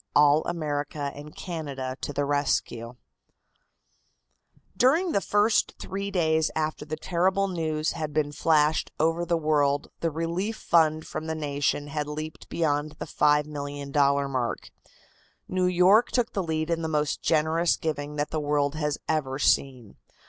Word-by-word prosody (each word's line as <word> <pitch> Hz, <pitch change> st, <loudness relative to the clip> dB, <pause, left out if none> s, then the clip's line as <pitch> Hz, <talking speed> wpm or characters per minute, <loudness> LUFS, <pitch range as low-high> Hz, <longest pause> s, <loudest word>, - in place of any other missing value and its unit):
All 150 Hz, +1 st, +5 dB
America 145 Hz, -3 st, -3 dB
and 150 Hz, +1 st, -11 dB
Canada 140 Hz, -7 st, -5 dB
to -, -, -3 dB
the 145 Hz, 0 st, -1 dB
Rescue 130 Hz, -4 st, -1 dB, 1.8 s
During 310 Hz, -, +3 dB
the 200 Hz, -, +1 dB
first 210 Hz, +3 st, +2 dB
three 200 Hz, +1 st, -4 dB
days 160 Hz, -4 st, +2 dB
after 155 Hz, -1 st, -2 dB
the 155 Hz, +1 st, -4 dB
terrible 190 Hz, +3 st, +1 dB
news 160 Hz, -4 st, -1 dB
had 155 Hz, -2 st, -4 dB
been 145 Hz, -1 st, 0 dB
flashed 155 Hz, 0 st, +2 dB
over 165 Hz, +2 st, +1 dB
the 170 Hz, 0 st, +2 dB
world 145 Hz, -2 st, +1 dB
the 165 Hz, -, 0 dB
relief 170 Hz, +7 st, -2 dB
fund 155 Hz, -2 st, +2 dB
from 160 Hz, -, -5 dB
the 160 Hz, -, -2 dB
nation 145 Hz, -1 st, -1 dB
had 150 Hz, 0 st, -3 dB
leaped 155 Hz, +1 st, -7 dB
beyond 150 Hz, -2 st, 0 dB
the -, -, -7 dB
$5,000,000 145 Hz, -2 st, +1 dB
mark. 125 Hz, -3 st, -3 dB, 0.8 s
New 185 Hz, 0 st, +1 dB
York 180 Hz, +6 st, +5 dB
took 245 Hz, -2 st, 0 dB
the 195 Hz, -, 0 dB
lead 160 Hz, -1 st, -2 dB
in 165 Hz, 0 st, 0 dB
the 160 Hz, -, -2 dB
most 150 Hz, -2 st, -1 dB
generous 160 Hz, +2 st, +2 dB
giving 150 Hz, -2 st, -3 dB
that 150 Hz, +1 st, -2 dB
the 155 Hz, -, -1 dB
world 145 Hz, -1 st, +1 dB
has 150 Hz, -1 st, -1 dB
ever 140 Hz, -4 st, -1 dB
seen. 130 Hz, -5 st, 0 dB
155 Hz, 150 wpm, -26 LUFS, 145-165 Hz, 1.8 s, All